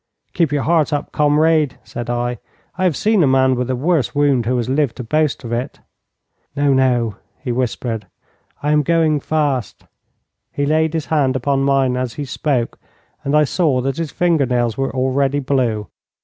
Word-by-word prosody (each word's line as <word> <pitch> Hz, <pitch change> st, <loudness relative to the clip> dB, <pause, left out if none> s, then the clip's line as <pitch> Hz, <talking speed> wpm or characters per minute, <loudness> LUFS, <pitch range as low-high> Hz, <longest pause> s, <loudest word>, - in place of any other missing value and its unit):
'Keep 165 Hz, -5 st, +1 dB
your 145 Hz, -2 st, 0 dB
heart 160 Hz, -2 st, +2 dB
up, 145 Hz, -1 st, -2 dB
comrade,' 150 Hz, -1 st, +2 dB
said 120 Hz, 0 st, -7 dB
I; 120 Hz, 0 st, -2 dB, 0.4 s
'I 185 Hz, -, +2 dB
have 175 Hz, -5 st, +2 dB
seen 215 Hz, -2 st, +2 dB
a 150 Hz, -, +4 dB
man 130 Hz, 0 st, +3 dB
with 125 Hz, 0 st, -2 dB
a 130 Hz, -, 0 dB
worse 150 Hz, +2 st, 0 dB
wound 140 Hz, -5 st, +2 dB
who 125 Hz, +1 st, +1 dB
has 120 Hz, -, -1 dB
lived 135 Hz, -1 st, 0 dB
to 125 Hz, -, -6 dB
boast 150 Hz, +3 st, 0 dB
of 120 Hz, -, -6 dB
it.' 120 Hz, +2 st, -3 dB, 0.8 s
'No, 145 Hz, -1 st, +2 dB
no,' 120 Hz, -5 st, +1 dB, 0.2 s
he 130 Hz, -, -4 dB
whispered; 120 Hz, -4 st, -2 dB, 0.6 s
'I 150 Hz, -, +1 dB
am 150 Hz, 0 st, +4 dB
going 160 Hz, 0 st, +2 dB
fast.' 145 Hz, -, -2 dB, 0.7 s
He 145 Hz, -, -1 dB
laid 160 Hz, +2 st, +1 dB
his 160 Hz, -, -2 dB
hand 135 Hz, -4 st, +2 dB
upon 135 Hz, +1 st, 0 dB
mine 135 Hz, -2 st, +2 dB
as 125 Hz, -2 st, -3 dB
he 145 Hz, -, -4 dB
spoke, 130 Hz, -3 st, -2 dB, 0.4 s
and 140 Hz, +2 st, 0 dB
I 150 Hz, -, +5 dB
saw 150 Hz, -3 st, +1 dB
that 135 Hz, +1 st, -2 dB
his 165 Hz, -2 st, -2 dB
finger 165 Hz, -6 st, +1 dB
nails 120 Hz, -2 st, 0 dB
were 135 Hz, 0 st, -1 dB
already 135 Hz, +2 st, 0 dB
blue. 130 Hz, -6 st, 0 dB
135 Hz, 185 wpm, -19 LUFS, 125-150 Hz, 0.8 s, I